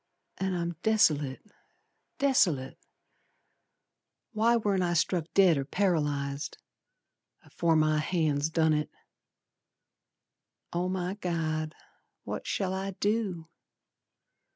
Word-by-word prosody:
An' 190 -1 -1
I'm 170 -1 -3
desolate, 150 -11 +2 0.7
desolate! 170 - +2 1.5
Why 230 +1 +3
warn't 205 -4 +1
I 175 -1 0
struck 170 0 +1
dead 180 -7 +5
or - - -1
paralyzed 145 -4 -1 0.9
Afore 165 -1 0
my 155 0 +3
hands 155 -3 0
done 160 -1 +2
it. 150 0 -1 1.8
Oh, 175 +1 0
my 185 0 -2
God, 160 -5 -2 0.5
what - - -5
shall 190 -2 -1
I 195 0 -4
do! 205 -6 -1
170 Hz, 95 wpm, -29 LUFS, 155-190 Hz, 1.8 s, dead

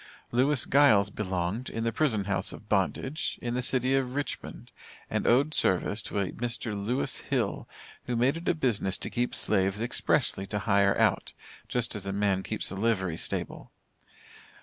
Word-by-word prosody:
Lewis 130 +2 +2
Giles 110 -8 +5
belonged, 95 +4 -2
in 115 - -3
the 115 - +1
prison 115 -8 +1
house 100 0 0
of 105 - -11
bondage, 110 - -1
in 120 0 -3
the 125 - 0
city 130 +1 +2
of 130 -1 -1
Richmond, 145 -2 -5 0.4
and - - 0
owed 140 +6 +4
service 100 0 +2
to - - -5
a 95 -2 -1
Mr. 120 -2 -3
Lewis 105 +6 -1
Hill, - - -2 0.4
who 125 - -1
made 125 +5 +2
it 165 +1 -3
a - - +2
business 110 - 0
to - - -5
keep 120 +1 -1
slaves 95 0 +1
expressly 110 -4 0
to 105 - -2
hire 100 -1 +3
out, - - +1 0.3
just 125 -1 -1
as 100 -1 -6
a - - -1
man 100 -1 +1
keeps 110 - -4
a - - -5
livery 95 -5 0
stable. - - -4
110 Hz, 170 wpm, -28 LUFS, 100-125 Hz, 0.4 s, Giles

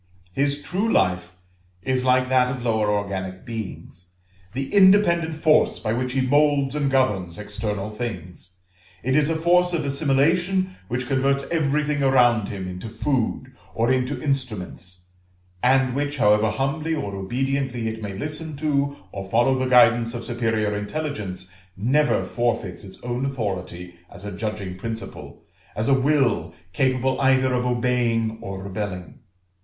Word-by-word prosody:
His 140 +3 0
true 205 +5 -1
life 90 -1 +1 0.5
is 130 -1 0
like 130 0 +3
that 125 -1 +3
of 125 -2 -5
lower 110 -2 +1
organic 95 -1 -3
beings, 105 -6 -7 0.4
the 135 +2 -4
independent 190 -5 +5
force 155 -1 +3
by 110 - -2
which 125 +1 -2
he 135 - +1
moulds 140 0 +2
and 145 -2 0
governs 105 -10 +1
external 105 0 -4
things; 95 -6 -6 0.5
it 130 +1 +1
is 150 0 +3
a 165 - 0
force 180 +2 +3
of 160 -4 -1
assimilation 165 +7 +1
which 125 +3 -2
converts 135 +1 +1
everything 150 -2 +1
around 120 -5 +3
him 95 -3 -5
into 90 +5 -6
food, 130 +1 -2 0.2
or 115 +3 +2
into 130 +1 0
instruments; 100 -9 -4 0.5
and 130 0 +3
which, 145 +2 -2
however 105 -2 +4
humbly 155 +6 -1
or 100 -9 -4
obediently 125 +3 -2
it 110 0 -4
may 100 -2 -5
listen 155 +5 -4
to 140 -1 0 0.2
or 95 -1 -7
follow 120 +5 +3
the 130 0 0
guidance 120 -1 +5
of 120 - -5
superior 110 -3 0
intelligence, 105 -6 -4 0.3
never 135 +9 +2
forfeits 115 -7 -2
its 95 -1 -12
own 120 +1 -2
authority 95 -9 -4 0.2
as 100 0 -11
a 105 - -4
judging 100 -3 -4
principle, 110 0 -7 0.3
as 110 +2 -1
a 140 - +4
will 130 - +1 0.2
capable 130 +3 +1
either 130 -1 +3
of 125 0 0
obeying 120 -2 0
or 95 -1 -6
rebelling. 100 +3 -5
125 Hz, 145 wpm, -23 LUFS, 105-140 Hz, 0.5 s, independent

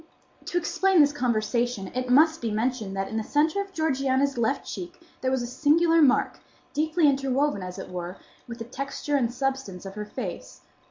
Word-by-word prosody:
To 355 - -2
explain 380 +1 +2
this 290 -1 +5
conversation 235 -4 -1
it 255 0 -2
must 315 +5 +5
be 230 - -1
mentioned 220 -2 -1
that 195 0 -1
in 220 - -4
the 220 - -1
centre 310 - +1
of 395 -1 -8
Georgiana's 275 -4 +1
left 240 +3 0
cheek 355 0 -7 0.2
there 260 - +1
was 260 -2 0
a - - -2
singular 325 +6 +3
mark, 275 -4 +3 0.3
deeply 315 +1 +2
interwoven, 275 -3 +1
as 180 0 -6
it 190 - -8
were, 180 +1 -5 0.3
with 235 -1 -7
the 230 - -6
texture 275 +3 -3
and 245 -4 +1
substance 260 -8 -3
of 195 - -7
her 210 +1 -5
face. 180 - -7
260 Hz, 185 wpm, -26 LUFS, 220-295 Hz, 0.3 s, this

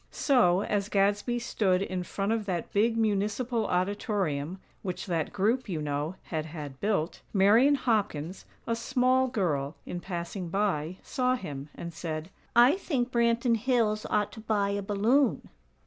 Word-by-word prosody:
So, 200 -10 +3
as 205 -1 -1
Gadsby 205 +4 +1
stood 195 -5 +1
in 185 -2 -3
front 195 +3 -2
of 225 -2 -1
that 175 -3 -3
big 225 +3 +2
Municipal 220 +2 0
Auditorium 185 - -1 0.2
(which 185 -3 -4
that 165 -5 -1
group, 225 +5 0
you 170 -4 -2
know, 150 +3 -2
had 160 -2 -4
had 145 -4 -8
built), 200 -6 -1
Marian 220 +8 +5
Hopkins, 195 - -1 0.2
a 230 - 0
small 255 +2 +2
girl, 165 - -1
in 175 - -5
passing 175 0 -5
by, 185 -3 -1
saw 255 -1 +1
him, 145 - -6
and 170 0 -7
said: 160 +1 -5 0.2
"I 245 +8 +6
think 260 -10 -1
Branton 235 0 +2
Hills 220 -3 +1
ought 210 0 +1
to 220 - -10
buy 215 -2 0
a 200 0 -1
balloon." 215 +8 +1
205 Hz, 150 wpm, -28 LUFS, 175-230 Hz, 0.2 s, I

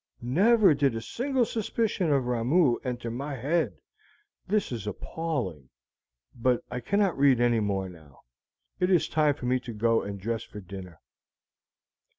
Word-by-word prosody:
Never 195 - +5
did 140 -4 +1
a - - -2
single 255 - 0
suspicion 215 -5 -1
of 135 -3 +2
Ramoo 125 +3 +2
enter 120 -2 -4
my 140 +4 -4
head. 145 +8 0 0.7
This 205 -3 0
is 110 -4 -5
appalling; 105 - -4 0.6
but 125 +1 +1
I 125 - -3
cannot 195 - +1
read 135 -3 +4
any 120 -1 +3
more 100 -2 -1
now. 80 -6 -15 0.6
It 180 0 +2
is 180 -3 +3
time 150 -2 +2
for 125 - -8
me 130 +1 +2
to 120 -2 -8
go 115 +1 +2
and 100 0 -6
dress 115 +3 -2
for 105 - -10
dinner." 90 -4 -10
125 Hz, 155 wpm, -27 LUFS, 115-165 Hz, 0.7 s, Never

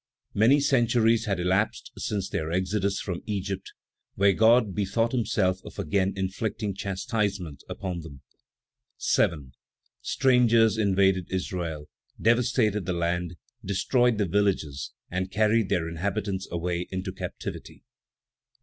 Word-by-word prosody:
Many 115 +8 +5
centuries 120 -4 +3
had 100 -4 -1
elapsed 95 +4 0
since 100 -3 -2
their 80 0 -3
exodus 95 +2 0
from 90 -3 -4
Egypt, 100 -2 -3 0.4
when 100 -1 +4
God 115 -2 +4
bethought 110 +4 0
himself 100 -6 0
of - - -11
again 95 +1 0
inflicting 100 +2 -2
chastisement 100 - -3
upon 90 -3 -4
them. 75 -5 -11 0.7
7. 70 -6 +1 0.5
Strangers 115 -4 +4
invaded 95 -3 +2
Israel, 85 -5 -3 0.3
devastated 115 -4 +2
the 90 - 0
land, 85 0 -1 0.3
destroyed 115 +4 +2
the 105 - +1
villages, 90 -7 0 0.2
and 95 +1 -2
carried 110 0 +2
their 80 -2 +1
inhabitants 95 +3 -3
away 85 +1 -2
into 95 0 -4
captivity. 95 - -7
8. - - -25
100 Hz, 120 wpm, -26 LUFS, 90-110 Hz, 0.7 s, Many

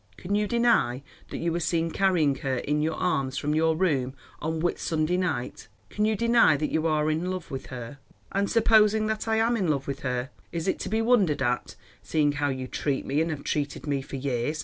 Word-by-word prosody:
Can 190 - -4
you 210 0 +2
deny 230 - +2 0.3
that - - -5
you 170 0 -1
were 170 - -1
seen 165 0 0
carrying 175 -7 +2
her 135 -1 -2
in 150 +4 -1
your 160 +1 0
arms 135 -7 -1
from 150 +1 -1
your 160 +1 +2
room 140 -7 0 0.3
on 160 +1 -2
Whit 175 +2 -1
Sunday 160 +2 0
night? 150 - -2 0.2
Can 210 - 0
you 220 0 +2
deny 230 -8 +4
that 150 +1 -2
you 160 +1 +1
are 155 -1 +1
in 165 +4 -1
love 185 -2 -5
with 135 - -5
her?" 125 +2 -8 0.3
"And 200 0 0
supposing 220 -1 +4
that 220 +1 -2
I 220 - +2
am 225 +2 +2
in 195 -6 0
love 140 -3 0
with 140 - -4
her, 125 0 -3 0.2
is 170 +1 -3
it - - 0
to - - -4
be 220 +1 +1
wondered 200 - +3
at, 120 -5 -1 0.3
seeing 150 -2 +1
how 145 0 -1
you 130 -1 -3
treat 140 +1 -2
me 145 +3 +1
and 165 - 0
have 150 -3 -4
treated 145 -1 -2
me 140 -2 -1
for 135 - -8
years?" 135 +2 -2
155 Hz, 225 wpm, -26 LUFS, 140-190 Hz, 0.3 s, deny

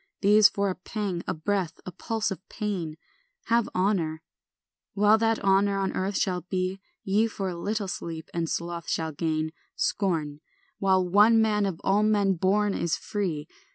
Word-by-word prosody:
These 210 +1 +7
for 200 -1 0
a - - -5
pang, 190 -2 -4
a - - 0
breath, 180 +1 -2
a 185 - -5
pulse 220 +4 -2
of 195 - -5
pain, 185 -8 -3 0.5
Have 230 -1 +3
honour, 175 -5 0 0.7
while 210 +2 +5
that 225 0 +2
honour 195 +1 +3
on 195 -1 -1
earth 190 +1 -1
shall 180 -2 0
be: 185 +1 -3 0.2
Ye 210 +4 +2
for 195 -3 -4
a 180 - -5
little 205 +4 -2
sleep 165 -3 -5
and 170 -1 -1
sloth 170 -1 -4
shall 160 -1 -1
gain 155 0 -1 0.2
Scorn, 155 -7 -1 0.4
while 190 -2 +3
one 210 +5 +6
man 210 -2 +2
of 180 -4 -4
all 195 +2 +3
men 205 -2 +3
born 200 +3 +1
is 170 - 0
free. 175 -8 -3
195 Hz, 165 wpm, -27 LUFS, 170-210 Hz, 0.7 s, These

